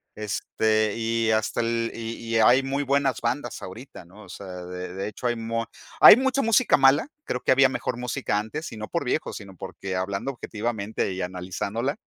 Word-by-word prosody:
este 110 0 0
y 115 0 0
hasta 110 0 +1
el 115 0 -1
y 115 0 -5 0.2
y - - 0
hay 120 +4 +5
muy 135 +1 -1
buenas 140 -1 +1
bandas 120 +1 -2
ahorita, 105 +4 -10
¿no? 100 +5 -15
O - - -15
sea 100 - -9 0.2
de 90 0 -6
de 95 - -3
hecho 105 +4 -4
hay 120 - 0
mu 115 0 -2 0.4
hay - - +11
mucha 265 +1 +1
música 230 0 +4
mala, 135 - +4 0.2
creo 125 - -3
que - - +1
había 135 0 +6
mejor 130 - -3
música 120 -4 -1
antes 145 +10 -5
y 110 - -8
no 110 0 -6
por - - -2
viejo - - -1
sino 95 -2 -9
porque 95 +1 -6
hablando 100 +7 -2
objetivamente 110 -5 -3
y 95 - -4
analizándola, 95 +8 -3
115 Hz, 195 wpm, -25 LUFS, 100-130 Hz, 0.4 s, hay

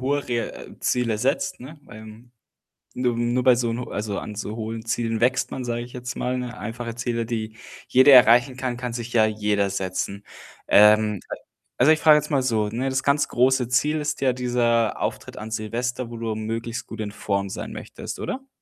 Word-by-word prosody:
hohe 140 +2 -1
re 120 -2 -2
äh, - - -12
Ziele 120 -3 0
setzt, 135 +5 -1
ne, 145 +5 -10
weil, 110 -2 -12 0.7
nur 125 -1 0
nur 120 +1 +1
bei 130 - +7
so 120 -1 0
'n 115 +1 -2
ho 125 - -6
also, 105 -1 -3
an 105 - -6
so 110 +1 -5
hohen 110 0 -5
Zielen 115 0 -1
wächst 125 +2 +1
man, 130 - -5
sage 120 0 -2
ich 120 +1 -10
jetzt 125 +1 -6
mal, 125 +1 -1
ne? 125 -1 -5
Einfache 115 +3 -5
Ziele, 115 -1 -2
die 110 -1 -4 0.3
jeder 130 +2 +7
erreichen 125 +1 +6
kann, 130 -2 -3
kann 125 -1 -4
sich 120 0 -5
ja 110 -2 +4
jeder 105 -2 0
setzen. 100 +1 -3 0.4
Ähm, 105 -1 +5
äh, - - -4 0.4
also 140 +6 +5
ich 155 - +2
frage 155 -1 +7
jetzt 150 +1 -2
mal 140 -3 +2
so, 110 -4 0
ne: 125 +5 -2
Das 130 0 -1
ganz 140 +1 +2
große 125 0 +2
Ziel 150 +5 +1
ist 150 -1 -3
ja 130 -2 +3
dieser 120 -2 +1
Auftritt - - -4
an 110 +1 -7
Silvester, 120 +3 -3
wo 120 - -7
du 115 -1 -3
möglichst 115 +2 -4
gut 115 - -8
in 105 -1 -4
Form 100 -2 -2
sein - - -6
möchtest, - - -8
oder? 265 +1 -5
120 Hz, 205 wpm, -24 LUFS, 110-125 Hz, 0.7 s, bei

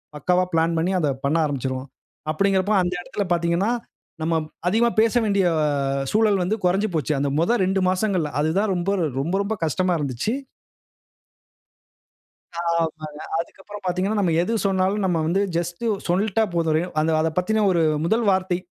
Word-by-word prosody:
பக்காவா 180 +5 +2
பிளான் 165 +1 +2
பண்ணி 170 +3 +1
அதை 150 - +1 0.2
பண்ண 150 +4 +2
ஆரம்பிச்சுருவான். 130 -2 -3 0.4
அப்படீங்கிறப்ப 195 +4 +1
அந்த 175 0 -1
இடத்துல 200 - -3
பாத்தீங்கன்னா, 170 +5 +1 0.5
நம்ம 160 +1 +1 0.3
அதிகமா 225 +6 +3
பேச 225 -1 +2
வேண்டிய 200 -2 +2 0.2
அ - - +2 0.5
சூழல் 215 -2 +3
வந்து 190 +5 0
கொறஞ்சு 195 +4 +2
போச்சு. 155 -1 0
அந்த 140 +1 0
மொத 175 +9 +2
2 190 +1 +1
மாசங்கள்ல 185 -4 0
அதுதான் 185 +8 +1
ரொம்ப 175 +2 -1 0.3
ரொம்ப 165 +7 -2
ரொம்ப 205 +2 -2
கஷ்டமாருந்துச்சு. 160 - -1 2.3
ஆமாங்க. 160 -3 -2 0.2
அதுக்கப்புறம் 200 +4 -8
பாத்தீங்கன்னா, 185 +4 0
நம்ம 175 -4 +1
எது 220 +6 -1
சொன்னாலும் 195 +2 +1
நம்ம 180 -3 +1
வந்து 185 +4 +1 0.2
ஜஸ்ட்டு 175 +7 -3 0.2
சொல்ட்டா 200 +5 +1
போதும். 165 -2 +1
ரேவ் 175 +3 -2
அந்த 160 +1 +1
அதப் 160 +2 -2
பத்தின 215 +4 +1
ஒரு 170 -2 +2 0.2
முதல் 225 +6 +1
வார்த்தை 185 -1 +1
180 Hz, 150 wpm, -23 LUFS, 160-200 Hz, 2.3 s, அதிகமா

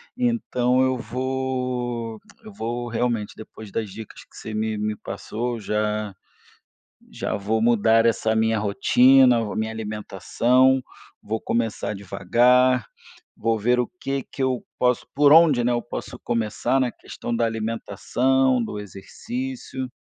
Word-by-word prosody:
Então, 130 - +1
eu 130 0 +2
vou 125 -2 -3 0.2
eu 215 -2 -11
vou 120 - -4
realmente, 115 -2 -1
depois 110 -1 -11
das 110 -3 -3
dicas 110 +2 -10
que - - -24
você 110 - -7
me 110 0 -1
me 105 0 -2
passou, 115 +4 -5
já 105 -1 -2 1.0
já - - -3
vou 110 +3 -1
mudar 115 0 +4
essa 110 -1 +2
a - - +1
minha 110 0 +2
rotina, 125 +4 +5
vou 105 - -4
a - - -7
minha 110 0 -2
alimentação, 115 +4 +1 0.4
vou 110 +2 -3
começar 115 -2 -2
devagar. 120 +6 +2 0.5
Vou 115 0 0
ver 120 +4 +2
o 125 - +1
que 135 0 -2
que 135 - -3
eu 130 -2 0
posso, 125 -1 +1
por 145 +1 +5
onde, 155 -7 +6
né, 125 - +2
eu 120 0 0
posso 125 +1 -7
começar 115 +3 -1
na 125 -2 +1
questão 120 +1 -6
da 115 0 +1
alimentação, 115 +3 0
do 105 -2 -5
exercício. 130 - -6
120 Hz, 145 wpm, -23 LUFS, 110-130 Hz, 1.0 s, onde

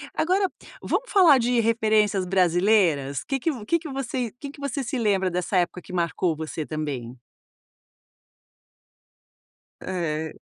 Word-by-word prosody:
Agora, 375 +3 +2 0.3
vamos - - -2
falar 345 -9 +7
de 240 0 +1
referências 215 -3 +2
brasileiras, 175 -6 +2
que 270 - -2
que 325 - 0
vo 245 -7 -7
que 335 +11 +1
que 325 -2 -8
você 260 -4 -3
que 280 - -6
que 285 - -13
você 280 0 -3
se 250 +2 -3
lembra 195 -5 +1
dessa 180 +2 -1
época 180 0 -1
que 185 - -11
marcou 170 -1 0
você 155 0 -5
também? 140 -6 -5 2.6
Eh. 160 -4 -3
205 Hz, 135 wpm, -24 LUFS, 170-265 Hz, 2.6 s, falar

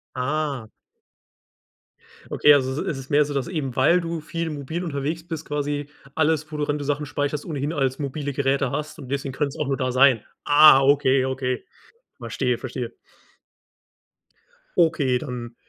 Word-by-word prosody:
Ah. 140 -2 -2 1.6
Okay, 150 - +6
also 130 0 +1
i - - -6
ist 140 - -3
es 135 0 -9
mehr 145 +1 +4
so, 145 - -5
dass 140 -2 -1
eben, 150 -8 -3
weil 180 +1 +4
du 165 -1 -3
viel 165 +1 -4
mobil 150 +4 -4
unterwegs 160 +1 -3
bist, 160 -2 -5
quasi 145 0 -2 0.3
alles, 155 0 +1
wo 150 - -5
du, 150 -1 -1
wenn 145 - 0
du 145 - -5
Sachen 145 +1 -1
speicherst 145 0 -2
ohnehin 145 -1 -3
als 135 -3 0
mobile 145 0 -3
Geräte 135 -1 +1
hast, 150 +2 -4
und 130 - -9
deswegen 140 -1 -3
könnte 140 +2 -1
es - - -10
auch 150 - -2
nur 135 -1 0
da 130 -1 -1
sein. 130 -3 +5 0.2
Ah, 145 -1 +8
okay, 135 -1 +4
okay. 130 -1 -2 0.6
Verstehe, - - -1
verstehe. - - -5 1.9
Okay, 155 -7 +3
dann, 120 -1 -6
145 Hz, 170 wpm, -23 LUFS, 135-150 Hz, 1.9 s, Ah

